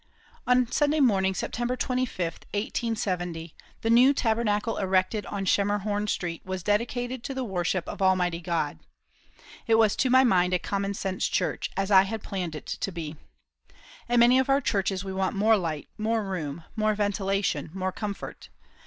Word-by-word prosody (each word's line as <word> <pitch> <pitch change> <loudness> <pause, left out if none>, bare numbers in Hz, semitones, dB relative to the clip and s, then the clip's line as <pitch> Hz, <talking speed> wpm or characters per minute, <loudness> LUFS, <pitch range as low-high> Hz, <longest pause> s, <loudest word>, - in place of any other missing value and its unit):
On 250 0 +4
Sunday 295 +1 +2
morning, 190 -8 +3
September 240 +6 -2
25, 250 -10 -1 0.2
1870, 180 -7 -2 0.3
the 225 - +1
new 255 +4 +6
Tabernacle 225 -2 0
erected 190 +2 0
on 200 -1 -3
Schemerhorn 205 +1 +1
Street 170 -4 -3
was 185 -1 -5
dedicated 240 +4 -1
to 270 - -5
the 260 - -2
worship 185 -4 -1
of - - -6
Almighty 180 -3 +2
God. 165 -4 -2 0.9
It 225 - +5
was 220 -2 +4
to 260 - +2
my 260 +1 +6
mind 180 -6 +3
a - - +4
common 200 +3 -2
sense 190 -1 -1
church, - - -1
as 195 +1 -1
I 190 -1 +8
had 210 +2 -4
planned 180 -5 -4
it 150 - -8
to 195 - -3
be. 165 -3 -6 0.9
In 240 -1 +4
many 245 +2 +6
of 265 - 0
our 275 +1 +4
churches 195 -6 -1
we 190 - -4
want 190 0 -1
more 215 +3 +4
light, 165 -7 -3
more 220 +1 0
room, 165 -5 -4
more 215 -1 +1
ventilation, 195 -6 -1
more 190 +1 -2
comfort. 205 +1 -6
200 Hz, 165 wpm, -27 LUFS, 185-225 Hz, 0.9 s, I